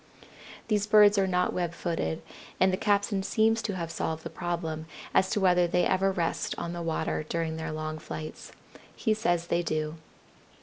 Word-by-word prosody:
These 210 -2 +1
birds 210 -1 +7
are 190 - +2
not 180 -1 +1
web 175 -1 -2
footed, 165 - -2 0.4
and 185 0 +4
the - - +4
captain 200 0 +1
seems 225 +3 +2
to 205 -3 -3
have 170 -2 -4
solved 160 -1 -3
the 165 - -6
problem 165 -2 -3 0.3
as 190 - +4
to 215 - 0
whether 180 -2 +4
they 180 +1 +2
ever 190 +1 +2
rest 170 -3 -1
on 170 - -4
the 175 - -4
water 165 -1 -1
during 165 -1 -1
their 160 0 -4
long 155 0 -4
flights. 155 0 -7 0.4
He 220 - +1
says 175 -6 0
they 170 0 +1
do. 155 -1 -2
175 Hz, 180 wpm, -28 LUFS, 160-195 Hz, 0.4 s, birds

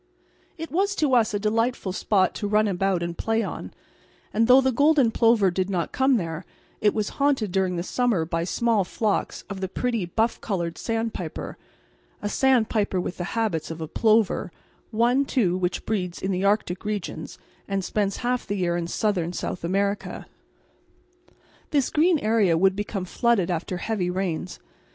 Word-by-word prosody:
It 325 0 -6
was 395 +4 +1
to 295 -7 +1
us 230 -3 +4
a 205 - 0
delightful 220 -1 0
spot 190 -1 +2
to 205 - -3
run 210 +1 +3
about 190 -2 0
and 170 0 -3
play 225 +3 0
on, - - -6 0.6
and 225 +2 +3
though 255 +1 +8
the 265 0 +2
golden 285 -1 +4
plover 225 -5 +4
did 185 +2 -1
not 180 -4 -1
come 265 -1 +3
there 165 -2 -4 0.4
it 210 - +3
was 215 -2 0
haunted 270 -8 +2
during 185 -1 +1
the 170 - -2
summer 225 -5 +1
by 165 0 -2
small 225 +3 +1
flocks 205 +3 -2
of 200 -1 -6
the 190 - -1
pretty 230 -2 -2
buff 225 +6 0
coloured 170 -5 -3
sandpiper, 225 -8 -3 0.6
a 205 - -3
sandpiper 220 -6 +2
with 180 - -4
the 175 - -3
habits 185 -9 -1
of 165 0 -6
a 160 - -4
plover, 215 0 +2 0.4
one, 240 +4 +2
too, 220 -10 +1
which 180 -1 -2
breeds 180 -5 -2
in 190 - -2
the 185 0 -1
arctic 200 -3 +1
regions 210 -3 -4 0.3
and 195 -2 -2
spends 200 -1 -1
half 250 0 0
the 205 - -1
year 175 -2 0
in 170 -1 -2
southern 180 -3 -1
South 180 - -4
America. 200 +3 -1 1.4
This 280 -5 +1
green 330 +2 +4
area 215 - +2
would 190 +2 +3
become 200 -2 -3
flooded 200 -2 +1
after 175 +2 -3
heavy 190 -1 -2
rains. 180 -1 -3
205 Hz, 170 wpm, -25 LUFS, 180-230 Hz, 1.4 s, though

